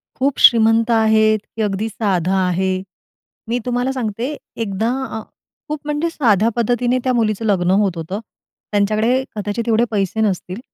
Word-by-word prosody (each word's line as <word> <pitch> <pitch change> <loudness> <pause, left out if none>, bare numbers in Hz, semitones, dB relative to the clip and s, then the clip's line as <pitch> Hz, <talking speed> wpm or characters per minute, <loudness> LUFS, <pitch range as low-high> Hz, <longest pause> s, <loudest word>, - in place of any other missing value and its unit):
खूप 275 +1 0
श्रीमंत 225 0 +5
आहेत, 220 -1 +4 0.2
की 225 - -3
अगदी 205 +1 -1
साधा 190 -4 0
आहे. 185 +1 0 0.7
मी 240 +1 0
तुम्हाला 245 +1 0
सांगते, 245 +2 -3 0.2
एकदा 220 0 -1 0.3
आ - - -5 0.5
खूप 300 0 -3
म्हणजे 300 +3 -1
साध्या 225 - +2
पद्धतीने 245 +1 +1
त्या 255 - +1
मुलीचं 225 -2 0
लग्न 185 -4 +2
होत 190 -4 0
होतं. 165 +5 -4 0.5
त्यांच्याकडे 215 +5 +2
कदाचित 210 +2 -3
एवढे 230 +1 +3
पैसे 205 +1 -1
नसतील. 190 -2 -1
220 Hz, 145 wpm, -19 LUFS, 200-240 Hz, 0.7 s, श्रीमंत